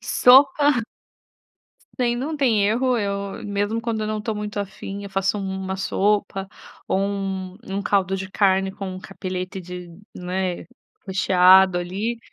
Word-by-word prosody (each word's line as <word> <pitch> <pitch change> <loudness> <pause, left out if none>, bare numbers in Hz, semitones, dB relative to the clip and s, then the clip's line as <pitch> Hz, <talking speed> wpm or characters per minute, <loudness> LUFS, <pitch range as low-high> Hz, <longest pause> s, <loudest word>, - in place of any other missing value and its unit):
sopa. 265 0 +5 1.1
Tem 240 -1 +1
não 300 +5 -3
tem 235 -7 +3
erro. 245 +5 +2
Eu, 200 -2 -3
mesmo 205 +2 -1
quando 230 -2 -2
eu 215 - -2
não 215 0 -2
tô 220 0 -3
muito 210 0 -4
afim, 200 0 -6
eu 200 - -7
faço 195 +1 0
um 190 -1 -4
uma 190 0 -3
sopa, 195 0 0 0.4
ou 190 - +1
um0 195 -1 -3
um 200 - -1
caldo 195 -2 +1
de 190 0 -5
carne 195 -1 +2
com 195 0 -6
um 185 - -7
cappeletti 185 -1 -5
de 180 0 -8 0.3
né, 180 -1 -3 0.4
recheado 185 0 +5
ali. 200 +7 -3
195 Hz, 150 wpm, -23 LUFS, 190-215 Hz, 1.1 s, sopa